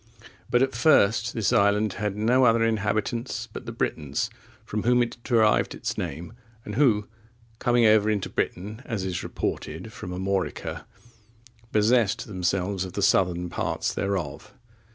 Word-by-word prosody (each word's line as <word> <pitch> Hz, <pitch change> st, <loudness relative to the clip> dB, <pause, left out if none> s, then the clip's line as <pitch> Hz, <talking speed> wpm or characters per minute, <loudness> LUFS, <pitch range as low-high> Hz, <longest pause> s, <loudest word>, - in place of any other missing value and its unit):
But 120 Hz, +1 st, +4 dB
at 135 Hz, -, 0 dB
first 115 Hz, -6 st, +3 dB
this 110 Hz, -3 st, +1 dB
island 100 Hz, 0 st, +3 dB
had 105 Hz, -1 st, -3 dB
no 120 Hz, +5 st, +3 dB
other 115 Hz, -1 st, +4 dB
inhabitants 115 Hz, +3 st, -1 dB
but 125 Hz, -, -8 dB
the -, -, -3 dB
Britons, 75 Hz, -11 st, -2 dB, 0.3 s
from 105 Hz, -, -3 dB
whom 125 Hz, +2 st, +3 dB
it 120 Hz, -, -6 dB
derived 110 Hz, -3 st, +3 dB
its -, -, -3 dB
name, 85 Hz, +9 st, -5 dB, 0.3 s
and 105 Hz, -, -6 dB
who, 110 Hz, -5 st, +3 dB, 0.5 s
coming 120 Hz, -2 st, +3 dB
over 110 Hz, -1 st, +5 dB
into 105 Hz, -3 st, 0 dB
Britain, 105 Hz, +6 st, -3 dB
as 105 Hz, -5 st, -3 dB
is 90 Hz, -2 st, -2 dB
reported, 90 Hz, +8 st, -4 dB
from 90 Hz, -, -8 dB
Armorica,(28) 95 Hz, +1 st, -3 dB, 0.9 s
possessed 110 Hz, 0 st, +2 dB
themselves 95 Hz, 0 st, -1 dB
of 95 Hz, -2 st, -7 dB
the 100 Hz, -, -2 dB
southern 90 Hz, -3 st, +2 dB
parts -, -, -2 dB
thereof. 90 Hz, -, -3 dB
105 Hz, 145 wpm, -26 LUFS, 95-115 Hz, 0.9 s, over